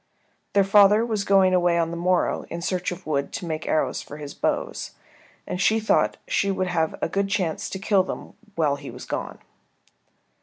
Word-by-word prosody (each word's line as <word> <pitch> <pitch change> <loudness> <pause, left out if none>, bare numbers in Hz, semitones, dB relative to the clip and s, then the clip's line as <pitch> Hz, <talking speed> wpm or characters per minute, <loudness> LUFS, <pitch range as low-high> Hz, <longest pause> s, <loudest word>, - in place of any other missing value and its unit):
Their 200 - +5
father 205 +3 +5
was 215 -4 -1
going 195 -2 +4
away 175 -1 +3
on 165 -1 0
the - - -4
morrow 180 +1 +1
in 170 +1 -5
search 180 0 -1
of 180 - -8
wood 140 -2 -1
to - - -4
make 160 -2 -4
arrows 155 - 0
for 150 - -10
his 145 -1 -7
bows, - - -2 0.5
and 180 - -3
she 220 +3 +3
thought 220 - +2
she - - +1
would 190 -1 0
have 165 -2 0
a - - +2
good 195 +4 -1
chance 180 -5 -1
to - - -4
kill 195 0 +3
them 185 - -6 0.2
while 150 -4 +1
he 140 -1 -9
was - - -9
gone. - - -4
180 Hz, 195 wpm, -24 LUFS, 165-200 Hz, 0.5 s, Their